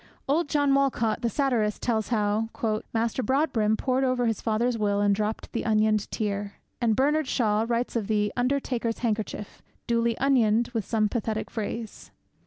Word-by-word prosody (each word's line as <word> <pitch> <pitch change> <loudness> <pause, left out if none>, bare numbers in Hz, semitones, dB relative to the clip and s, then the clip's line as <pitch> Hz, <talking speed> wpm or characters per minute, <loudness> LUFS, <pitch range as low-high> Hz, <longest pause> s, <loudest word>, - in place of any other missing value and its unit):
Old 295 +2 +1
John 285 -2 +2
Wolcott, 255 -5 +1
the 235 - +1
satirist, 235 -6 0
tells 220 -3 0
how...... 215 -1 0 0.4
Master 230 +2 0
Broadbrim 250 -6 +1
Pored 260 0 0
o'er 255 -2 +1
his 225 -3 -1
father's 235 +2 +1
will 205 -2 0
and 205 0 +3
dropped 210 +2 -3
the - - -1
onioned 215 -1 +2
tear. 205 -1 -3 0.3
And 225 -2 +2
Bernard 295 +3 +2
Shaw 220 -3 +1
writes 240 +1 -1
of 220 -4 -1
'the 210 -1 0
undertaker's 245 -2 -1
handkerchief, 215 -2 -3 0.2
duly 235 -1 +1
onioned 240 -4 +3
with 225 -5 -1
some 215 -2 +1
pathetic 220 0 -3
phrase.' 225 0 -5
230 Hz, 160 wpm, -26 LUFS, 215-250 Hz, 0.4 s, and